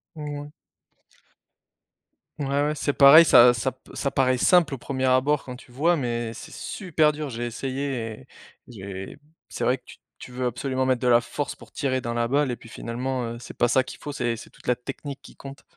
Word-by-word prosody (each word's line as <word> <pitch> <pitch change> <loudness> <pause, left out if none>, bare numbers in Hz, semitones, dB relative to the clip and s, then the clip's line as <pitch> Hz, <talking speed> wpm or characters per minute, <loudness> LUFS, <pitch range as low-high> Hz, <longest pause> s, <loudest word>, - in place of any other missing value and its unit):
Ouais. 145 -1 -6 1.9
Ouais, 140 - -2
ouais, 145 +2 +1
c'est 145 -1 -1
pareil 150 +4 +9
ça 120 -3 +8
ça 125 +3 -1
p 130 - -20
ça 140 - -1
paraît 130 -2 +1
simple 170 -6 +4
au 130 - -5
1er 130 0 -3
abord 130 +3 +2
quand 125 -1 -8
tu 125 0 -16
vois 165 +7 +2
mais 120 -4 -2
c'est - - -10
super 160 -6 0
dur. 150 -1 -5
J'ai 120 0 -4
essayé 135 +3 -3 0.3
et 130 - -19 0.4
j'ai 95 -4 -8 0.3
c'est - - -5
vrai 130 +1 +2
que - - -33
tu - - -13 0.2
tu 125 - -11
veux 125 0 -3
absolument 130 +2 -2
mettre 130 -1 +1
de 125 - 0
la 120 -1 +6
force 145 +4 -4
pour - - -16
tirer 130 -2 -1
dans 120 0 -3
la 120 0 +1
balle 145 0 +2
et 120 - -2
puis 115 - -15
finalement, 125 +2 -3
heu, - - -8
c'est - - -10
pas 120 - +2
ça 130 +2 +3
qu'il - - -10
faut 145 - -6
c'est 120 -3 -1
c'est - - -11
toute - - -21
la 125 - +2
technique 135 +3 -7
qui - - -15
compte. 135 0 -11
130 Hz, 215 wpm, -25 LUFS, 120-145 Hz, 1.9 s, pareil